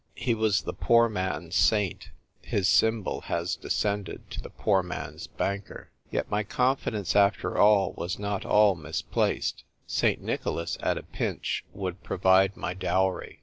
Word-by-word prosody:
He 120 - 0
was 110 -2 +1
the - - -4
poor 115 0 +4
man's 95 -5 -3
saint; 105 -5 +2 0.3
his 100 -2 0
symbol 110 +4 +2
has 85 +1 -1
descended 105 -1 -3
to - - -5
the - - -9
poor 100 -3 +1
man's 90 0 -6
banker. 100 0 -4 0.2
Yet - - -3
my 105 +1 +1
confidence 110 -4 0
after 100 0 +3
all 100 -2 +4
was 90 +1 -4
not 100 -1 -3
all 105 -1 +5
misplaced. 80 -2 -2 0.2
St. - - +1
Nicholas, 85 0 -2
at - - 0
a - - -6
pinch, - - -3
would 95 -1 -5
provide 95 +2 +3
my 90 - -3
dowry. 95 0 -1
100 Hz, 145 wpm, -27 LUFS, 95-105 Hz, 0.3 s, all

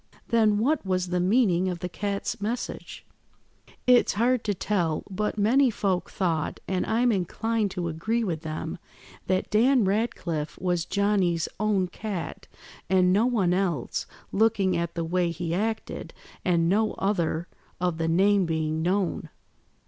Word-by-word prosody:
"Then, 220 -3 +3
what 285 +9 +1
was 185 -2 -1
the 180 0 0
meaning 185 -2 +3
of 180 - -3
the 180 - -4
cat's 200 +2 -3
message?" 230 +4 -4 0.8
"It's 250 -1 +5
hard 240 +3 +2
to 205 -2 0
tell; 175 -5 -1
but 210 +3 -2
many 250 +6 +4
folk 195 -5 -1
thought, 165 -6 -1
and 185 -1 -1
I'm 240 +2 +2
inclined 215 +3 0
to 175 -1 -1
agree 215 +9 -1
with 170 -7 -2
them, 160 +1 -5 0.5
that 185 0 0
Dan 240 +2 +4
Ratcliffe 185 -7 -1
was 175 -2 0
Johnny's 195 -5 +1
own 205 -3 +1
cat, 195 -3 -6 0.4
and 185 -1 +4
no 215 +5 +3
one 200 -8 +2
else, 180 -9 -1 0.2
looking 205 -3 +2
at 170 0 -2
the 170 -1 -2
way 175 +1 +1
he 170 0 -3
acted, 220 +4 -3 0.3
and 170 -2 +2
no 215 +4 +2
other 175 -4 -1 0.3
of 175 -2 -1
the 165 - 0
name 190 +2 +3
being 160 -1 -1
known. 185 +2 0
190 Hz, 150 wpm, -26 LUFS, 170-215 Hz, 0.8 s, It's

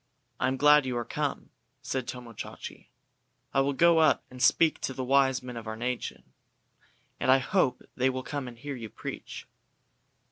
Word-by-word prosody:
"I 125 - +2
am 130 +1 0
glad 150 0 +6
you 125 -1 -1
are 120 - -2
come," - - -3 0.3
said 130 -2 -3
Tomo 125 -2 -7
Chachi. - - -8 0.7
"I 135 - +4
will 140 +1 +1
go 170 +3 +5
up 155 - +4
and 125 0 -9
speak 160 +5 +4
to 130 - -3
the 130 - -3
wise 135 0 +3
men 125 -1 -7
of 115 -1 -7
our 110 0 -4
nation, 125 +1 -3 1.0
and - - -1
I 130 - +8
hope 130 -1 +1
they 130 +1 +2
will 130 0 -3
come 145 -2 -4
and 120 -1 -9
hear 145 +2 -6
you 115 -3 -7
preach." - - -8
130 Hz, 185 wpm, -28 LUFS, 125-140 Hz, 1.0 s, I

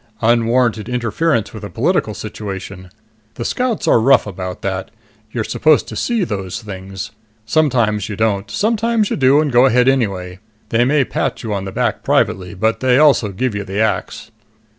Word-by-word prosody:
"Unwarranted 115 0 +2
interference 120 +1 0
with 110 -1 -9
a 105 - -6
political - - 0
situation. 95 -2 -7 0.5
The 120 - -5
Scouts 250 -3 -1
are - - +5
rough 130 +3 +4
about 90 -2 -6
that. 95 -1 -3 0.4
You're 115 -1 -2
supposed 155 +6 +2
to - - -7
see 235 -4 0
those 100 - -4
things. 95 -1 -7 0.3
Sometimes 115 -6 +1
you 105 - -4
don't. 105 -1 0
Sometimes 220 - 0
you - - +1
do 135 +1 +4
and 150 -2 0
go 125 +2 +5
ahead 125 0 +3
anyway. 95 -9 0 0.3
They 120 +1 +2
may 140 +1 +2
pat - - -3
you 110 -2 -3
on 100 -1 -3
the 95 - -5
back - - -1
privately, 90 0 0
but 110 +4 0
they 130 -1 +3
also 140 -7 +4
give 125 +4 -2
you 100 0 -3
the 95 0 -6
axe." 110 0 -2
115 Hz, 175 wpm, -18 LUFS, 100-135 Hz, 0.5 s, are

